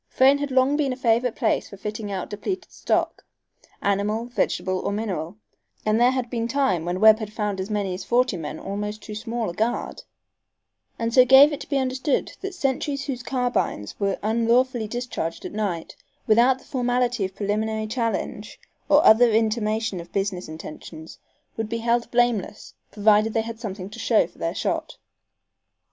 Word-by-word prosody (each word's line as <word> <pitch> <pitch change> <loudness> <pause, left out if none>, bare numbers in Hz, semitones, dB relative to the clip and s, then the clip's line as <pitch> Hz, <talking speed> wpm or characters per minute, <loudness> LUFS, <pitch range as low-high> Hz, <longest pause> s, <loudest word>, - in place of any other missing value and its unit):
Frayne 270 +2 +4
had 285 0 -2
long 265 +2 +3
been 285 -3 +1
a - - -2
favorite 235 -1 +1
place - - 0
for 200 - -11
fitting 210 +1 -5
out 190 -2 -3
depleted 370 - -4
stock, - - -1 0.6
animal, 205 +3 0
vegetable 185 -6 -1
or - - -2
mineral, 200 -4 -3 0.5
and 215 +2 +2
there 245 - +6
had 255 -2 -1
been 230 -1 -2
times 235 - +1
when 180 +1 -1
Webb 215 0 +5
found 210 -2 -3
as 190 - -5
many 205 -3 -1
as 180 - -5
forty 245 -3 +2
men 155 -2 -5
almost 210 +3 -5
too 215 - -8
small 225 +1 -3
a - - -10
guard, 225 +6 -2 1.0
and 230 0 -2
so 255 - +8
gave 270 +4 +7
it 290 - -4
to - - -10
be 280 - +1
understood 260 +2 0
that 390 -1 -5
sentries 280 -2 -1
whose 255 -4 -4
carbines 245 - -1
were 200 -1 0
unlawfully 235 +2 +2
discharged 240 -8 -4
at - - -5
night, 200 -6 -3 0.3
without 240 +4 +4
the - - -19
formality 245 -3 0
of 190 0 -4
preliminary 215 +1 -1
challenge 230 +1 -3 0.3
or 295 +1 +5
other 235 +2 +7
intimation 220 -2 0
of 170 0 -10
business 195 -2 -2
intentions, 160 0 -10 0.4
would 220 -1 -3
be 230 - -2
held 235 +1 0
blameless, 240 -4 0 0.2
provided 215 +1 +3
they 225 - +3
had 225 0 -7
something 195 -5 -6
to 210 - -10
show - - +3
for - - -18
their - - -2
shot. - - -2
225 Hz, 175 wpm, -24 LUFS, 205-250 Hz, 1.0 s, so